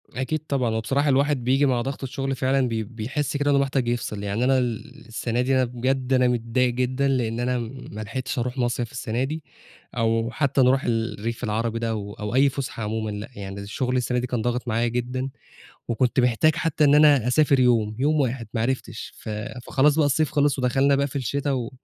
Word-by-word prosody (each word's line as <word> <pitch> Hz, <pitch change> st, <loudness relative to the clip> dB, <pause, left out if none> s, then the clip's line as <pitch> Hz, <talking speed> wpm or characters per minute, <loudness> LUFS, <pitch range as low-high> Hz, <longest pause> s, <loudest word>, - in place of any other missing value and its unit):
أكيد 135 Hz, +6 st, -2 dB
طبعًا، 130 Hz, -4 st, 0 dB
وبصراحة 135 Hz, +6 st, +1 dB
الواحد 140 Hz, -1 st, +2 dB
بييجي 135 Hz, +4 st, +3 dB
مع 125 Hz, -3 st, +2 dB
ضغط 135 Hz, +3 st, -4 dB
الشغل 135 Hz, +1 st, -3 dB
فعلًا 130 Hz, 0 st, +1 dB
بي 115 Hz, -2 st, -2 dB
بيحس 125 Hz, +7 st, -3 dB
كده 145 Hz, 0 st, +1 dB
إنه 140 Hz, -, +4 dB
محتاج 135 Hz, -2 st, 0 dB
يفصِل، 115 Hz, -4 st, -2 dB
يعني 100 Hz, +4 st, -1 dB
أنا 130 Hz, +1 st, +4 dB
ال 125 Hz, +2 st, -3 dB
السَنة 115 Hz, +1 st, -2 dB
دي 130 Hz, +2 st, +1 dB
أنا 130 Hz, -1 st, +3 dB
بجد 130 Hz, +2 st, -1 dB
أنا 125 Hz, -1 st, +4 dB
متضايق 120 Hz, +1 st, +1 dB
جدًا، 130 Hz, +2 st, 0 dB
لإن 120 Hz, -4 st, 0 dB
أنا 125 Hz, +1 st, 0 dB, 0.3 s
ما 105 Hz, -, -6 dB
لحقتش 125 Hz, +4 st, -4 dB
أروح 125 Hz, +2 st, -3 dB
مصيَف 120 Hz, -2 st, -1 dB
السَنة 120 Hz, -1 st, -2 dB
دي 155 Hz, +3 st, -4 dB, 0.5 s
أو 115 Hz, 0 st, +1 dB
حتى 140 Hz, 0 st, +1 dB
نروح 130 Hz, +2 st, +4 dB
ال 115 Hz, -2 st, -1 dB
الريف 115 Hz, +3 st, -4 dB
العربي 115 Hz, +1 st, -1 dB
ده 115 Hz, 0 st, -1 dB
أو 105 Hz, -2 st, -4 dB
أو 105 Hz, +1 st, -4 dB
أي 140 Hz, +2 st, +5 dB
فُسحة 130 Hz, -4 st, -5 dB
عمومًا، 110 Hz, +1 st, -2 dB
لأ 105 Hz, +1 st, -6 dB
يعني 100 Hz, 0 st, -7 dB
الشغل 125 Hz, +6 st, -2 dB
السَنة 125 Hz, 0 st, 0 dB
دي 125 Hz, -, -3 dB
كان 125 Hz, -2 st, -2 dB
ضاغِط 120 Hz, +2 st, -2 dB
معايا 115 Hz, +1 st, +1 dB
جدًا، 125 Hz, +2 st, -2 dB, 0.6 s
وكنت 125 Hz, +2 st, +2 dB
محتاج 125 Hz, +6 st, +3 dB
حتى 165 Hz, -1 st, +1 dB
إن 145 Hz, 0 st, +5 dB
أنا 145 Hz, -5 st, +6 dB
أسافر 140 Hz, 0 st, +4 dB
يوم، 115 Hz, -4 st, +2 dB
يوم 150 Hz, +3 st, +2 dB
واحد 125 Hz, -3 st, -1 dB
ما 115 Hz, -, 0 dB
عرفتش، 130 Hz, +2 st, -3 dB
ف -, -, -10 dB, 0.4 s
فخلاص 145 Hz, +2 st, +3 dB
بقى 155 Hz, -2 st, +4 dB
الصيف 145 Hz, +2 st, +1 dB
خلص، 145 Hz, -2 st, +2 dB
ودخلنا 135 Hz, +2 st, +3 dB
بقى 140 Hz, 0 st, +1 dB
في 140 Hz, -, -7 dB
الشتا 140 Hz, +2 st, -1 dB
و 125 Hz, -3 st, -2 dB
125 Hz, 205 wpm, -24 LUFS, 115-135 Hz, 0.6 s, أنا